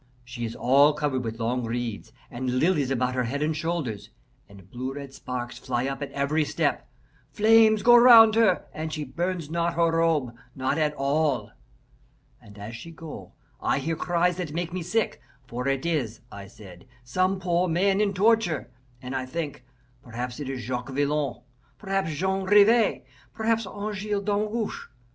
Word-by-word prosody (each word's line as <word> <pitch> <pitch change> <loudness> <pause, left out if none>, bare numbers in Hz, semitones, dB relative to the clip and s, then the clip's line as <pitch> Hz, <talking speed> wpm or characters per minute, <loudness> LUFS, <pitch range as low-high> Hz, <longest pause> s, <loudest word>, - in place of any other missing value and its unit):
She 120 -1 -5
is 115 - -6
all 140 +4 +4
covered 145 -4 -1
with 115 0 -5
long 120 +2 -1
reeds 115 -2 -4 0.2
and 125 +1 -2
lilies 150 -3 +2
about 125 -1 0
her 125 -1 0
head 140 +5 -2
and 155 +1 0
shoulders, 150 -10 -3 0.4
and 100 -2 -15
blue 130 +2 -5
red 140 -2 -8
sparks 125 -2 -6
fly 125 -1 -2
up 135 +1 -4
at 145 - -5
every 145 +3 0
step. - - -1 0.4
Flames 220 0 +5
go 240 0 +7
round 235 -2 +9
her, 220 -5 +3
and 155 0 -5
she 155 -1 -3
burns 170 +3 -3
not 170 0 0
her 165 -1 +2
robe 160 -7 +1 0.2
not 135 +3 -1
at 150 -1 +1
all. 140 -5 0 0.9
And 105 0 -16
as 105 +3 -8
she 115 +8 -9
go, 165 -1 -10 0.3
I - - +1
hear 160 +4 -2
cries 175 +1 0
that 175 -5 -4
make 170 +1 -3
me 185 - -3
sick, 220 +6 -1 0.2
for 125 +2 -4
it 135 +1 -1
is, 135 -10 -2
I 100 0 -9
said, 95 -1 -14 0.2
some 185 +10 0
poor 175 0 +1
man 195 +4 +2
in 200 -2 0
torture, 185 - +2 0.3
and 130 +1 -5
I 130 -1 -3
think, 145 -3 -5 0.4
perhaps 125 +1 -6
it 140 -3 -5
is 130 -2 -4
Jacques 125 +2 -4
Villon, 140 -2 -1 0.3
perhaps 195 -4 -2
Jean 190 +5 -1
Rivas, 210 - +4 0.3
perhaps 225 -1 0
Angele 205 0 -3
Damgoche. 210 +2 -2
150 Hz, 170 wpm, -26 LUFS, 125-185 Hz, 0.9 s, round